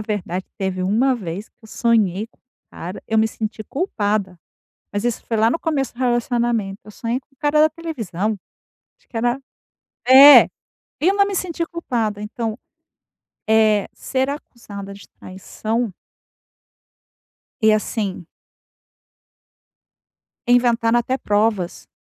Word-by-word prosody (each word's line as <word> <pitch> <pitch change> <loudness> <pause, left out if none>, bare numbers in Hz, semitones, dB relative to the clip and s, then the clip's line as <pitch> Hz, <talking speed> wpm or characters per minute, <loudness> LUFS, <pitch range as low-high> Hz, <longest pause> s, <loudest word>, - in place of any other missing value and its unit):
verdade 195 -4 -3
teve 190 -1 -2
uma 230 +8 +2
vez 195 -2 -6
que - - -54
eu 220 - -13
sonhei 215 -4 +1
com - - -36
um - - -53 0.3
cara 180 +3 -7
eu 220 - +1
me 220 0 +3
senti 220 0 -5
culpada, 205 - -2 0.5
mas 205 +2 -2
isso 240 -1 -1
foi 225 - -1
lá 220 +1 +3
no 330 - 0
começo 285 -6 -1
do - - -20
relacionamento. 240 -4 0
Eu 210 - -12
sonhei 235 +4 -3
com - - -47
o 275 - -30
cara 300 0 +2
da 310 - +6
televisão. 220 - -3 0.6
Acho - - -34
que 235 - -9
era... 240 +3 0 0.7
É! 275 +3 +10 0.6
Eu 370 +5 +3
não 400 0 +4
me 395 - -3
senti 340 -2 -2
culpada 235 -11 -3
então, 220 +1 -4 0.9
eh, 215 -2 +4
ser 265 0 -2
acusada 205 -8 -8
de 200 - -14
traição 215 +4 -4 1.7
E 220 0 +5
assim 205 -4 -2 2.2
inventaram 240 -1 +3
até 255 +2 -1
provas 205 -5 -1
225 Hz, 135 wpm, -21 LUFS, 205-255 Hz, 2.2 s, É